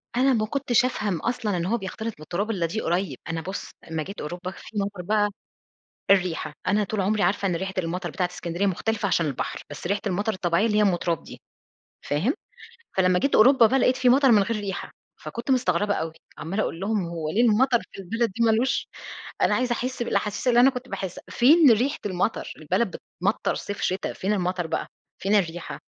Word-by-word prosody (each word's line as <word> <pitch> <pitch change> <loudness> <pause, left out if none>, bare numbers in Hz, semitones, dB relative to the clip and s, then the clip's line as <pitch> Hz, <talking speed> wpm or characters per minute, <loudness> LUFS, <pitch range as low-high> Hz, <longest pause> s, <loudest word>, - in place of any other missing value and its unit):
أنا 265 +1 +4
ما 215 -2 +1
كنتِش 250 -1 +2
أفهم 205 -8 -1
أصلًا 225 -4 -1
إن 170 - -1
هو 230 +5 +1
بيختلط 220 +3 -5
بالتراب 180 +8 -3
إلَّا 180 -5 0
دي 200 +7 -2
قريب. 175 -5 -1
أنا 165 0 -2
بُص، 190 +3 -6 0.2
أمَّا 160 -1 -1
جيت 195 +4 -8
أوروبا 175 +4 -5
في 210 - -10
مطَر 200 -2 -3
بقى 205 +2 +2 0.8
الريحة، 180 -5 +2
أنا 205 +2 +3
طول 205 0 -2
عمري 210 +2 +1
عارِفة 200 0 +1
إن 175 - 0
ريحة 190 +2 -3
المطر 180 0 -2
بتاعة 180 -1 -1
إسكندرية 175 +2 -3
مختلِفة 205 +3 0
عشان 170 -3 +2
البحر، 140 -4 -3
بس 145 +4 -6
ريحة 200 +1 0
المطر 205 +4 0
الطبيعية 180 +2 +1
اللي 210 -2 +1
هي - - +5
أم 195 -4 +4
تراب 170 -2 -2
دي، - - -12 0.6
فاهم؟ 180 - 0 0.6
فلمَّا 185 -1 +4
جيت 275 - +1
أوروبا 240 0 +7
بقى 265 +3 +2
لقِيت 255 +1 +3
في 255 -1 +3
مطَر 265 0 +5
من 205 -3 +6
غير 230 +1 -2
ريحة، 195 -2 -5 0.3
فكنت 245 +2 -4
مستغرِبة 205 -4 +2
أوي، 160 0 -3 0.2
عمَّالة 195 +6 -2
أقول 165 - -4
لهُم: 200 -2 0
"هو 165 -2 -4
ليه 215 +9 +2
المطر 235 +2 +4
في - - -11
البلد 230 +3 -1
دي 230 +4 0
ما 225 - +5
لوش 240 +4 +1 0.6
أنا - - +4
عايزة 250 -1 +1
أحس 250 0 -2
بالأحاسيس 215 +1 -1
اللي 240 0 +5
أنا 265 +2 +7
كنت 250 0 -7
باحس 190 -3 -5
فين 290 +3 +6
ريحة 250 +7 +1
المطَر؟ 185 +3 -1
البلد 185 +7 -1
بتمطَر - - -2
صيف 205 - -5
شتا، 185 +1 -1
فين 195 +3 -2
المطَر 180 -3 -1
بقى، - - -2 0.4
فين 200 +2 +2
الريحة؟" 175 -4 -1
200 Hz, 200 wpm, -25 LUFS, 180-230 Hz, 0.8 s, أوروبا